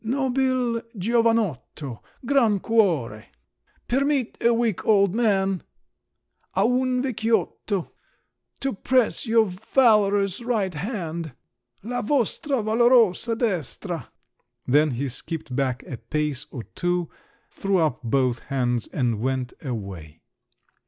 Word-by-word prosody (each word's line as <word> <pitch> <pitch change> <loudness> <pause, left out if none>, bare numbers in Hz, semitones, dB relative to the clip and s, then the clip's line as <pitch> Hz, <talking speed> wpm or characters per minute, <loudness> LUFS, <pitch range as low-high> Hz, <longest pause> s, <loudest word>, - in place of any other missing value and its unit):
(Nobil 255 -1 0 0.2
giovanotto! 210 - 0 0.2
Gran 235 -6 +3
cuore!) 170 - +1 0.6
permit 275 -1 +1
a 235 - +4
weak 230 -4 0
old 200 -3 +4
man 195 -5 +1 0.9
(a 190 - +2
un 250 +1 +1
vecchiotto!) 225 -5 -1 0.7
to 270 0 -1
press 250 +4 +1
your 225 0 +4
valorous 205 -1 +2
right 220 -6 -1
hand 170 - -4 0.5
(la 245 +3 -2
vostra 270 - 0
valorosa 230 -1 +4
destra!)" 180 - -2 0.6
Then 150 +4 +4
he 135 +2 -2
skipped 135 +1 -5
back 130 -2 -1
a 125 - -7
pace 150 +4 -2
or 125 -5 -7
two, 175 +3 -2 0.4
threw 195 -1 0
up 155 -7 +1
both 125 0 +1
hands, 125 -4 -1
and 120 -6 -1
went 130 +1 -2
away. 95 - -6
195 Hz, 105 wpm, -24 LUFS, 140-235 Hz, 0.9 s, a